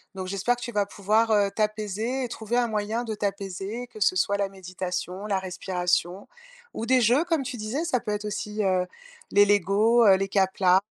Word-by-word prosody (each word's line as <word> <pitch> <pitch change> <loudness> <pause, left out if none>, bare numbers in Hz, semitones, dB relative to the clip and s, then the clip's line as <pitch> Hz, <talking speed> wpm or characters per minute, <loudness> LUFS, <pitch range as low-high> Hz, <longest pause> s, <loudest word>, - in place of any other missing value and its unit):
Donc 185 -1 -5
j'espère 200 +6 0
que 245 - -13
tu 240 - -5
vas 205 -2 +1
pouvoir, 215 +3 +1
heu, 205 -2 +3
t'apaiser 215 +4 -1
et - - -2
trouver 225 +1 -3
un 245 -1 +2
moyen 215 +2 -2
de 225 -2 -4
t'apaiser, 200 +3 -4
que 225 -3 -13
ce 190 - +3
soit 200 +2 +1
la 200 -1 -1
méditation, 185 0 -5
la 200 -2 0
respiration 180 0 -2 0.5
ou 225 - -4
des 255 +1 +4
jeux 245 +8 +4
comme 330 -5 0
tu 250 -1 -5
disais, 225 +8 -3
ça 255 -7 +1
peut 210 - -4
être 210 0 -3
aussi, 210 +1 -3
heu, 185 -2 +1 0.4
les 205 0 +6
Lego, 205 +4 +3
heu, 195 -2 +7
les 195 +1 -1
Kapla 190 -1 +3
205 Hz, 205 wpm, -26 LUFS, 190-230 Hz, 0.5 s, heu